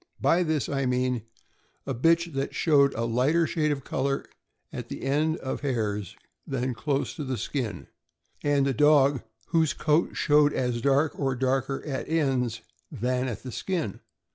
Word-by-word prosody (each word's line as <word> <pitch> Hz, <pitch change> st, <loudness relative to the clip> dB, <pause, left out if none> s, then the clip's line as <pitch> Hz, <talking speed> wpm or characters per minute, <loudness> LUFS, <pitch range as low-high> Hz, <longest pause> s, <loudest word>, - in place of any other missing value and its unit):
By 175 Hz, -, +3 dB
this 160 Hz, -4 st, 0 dB
I 135 Hz, -2 st, -1 dB
mean 125 Hz, -2 st, 0 dB, 0.6 s
a 135 Hz, -, -2 dB
bitch 165 Hz, +6 st, +2 dB
that 135 Hz, 0 st, -3 dB
showed 140 Hz, -4 st, +4 dB
a 115 Hz, -, -1 dB
lighter 130 Hz, +9 st, +2 dB
shade 155 Hz, -1 st, 0 dB
of 140 Hz, -2 st, -3 dB
color 135 Hz, +1 st, -1 dB, 0.5 s
at -, -, -6 dB
the -, -, -6 dB
end 150 Hz, +4 st, +1 dB
of 130 Hz, -, -4 dB
hairs 105 Hz, -, -2 dB, 0.3 s
than 130 Hz, -1 st, -1 dB
close 140 Hz, +3 st, -1 dB
to 150 Hz, -, -3 dB
the 130 Hz, -2 st, -3 dB
skin, 115 Hz, 0 st, -3 dB, 0.6 s
and 145 Hz, -1 st, +2 dB
a 135 Hz, -, +1 dB
dog 140 Hz, -1 st, +4 dB, 0.3 s
whose 160 Hz, -2 st, +2 dB
coat 155 Hz, +2 st, +1 dB
showed 150 Hz, -1 st, +4 dB
as 125 Hz, -2 st, -1 dB
dark 140 Hz, +4 st, +2 dB
or 135 Hz, -3 st, 0 dB
darker 135 Hz, +1 st, -1 dB
at 140 Hz, -2 st, -4 dB
ends 135 Hz, -7 st, 0 dB, 0.3 s
than 125 Hz, 0 st, -1 dB
at 115 Hz, -6 st, -5 dB
the 130 Hz, -, -6 dB
skin. 165 Hz, -, -3 dB
135 Hz, 165 wpm, -27 LUFS, 125-150 Hz, 0.6 s, showed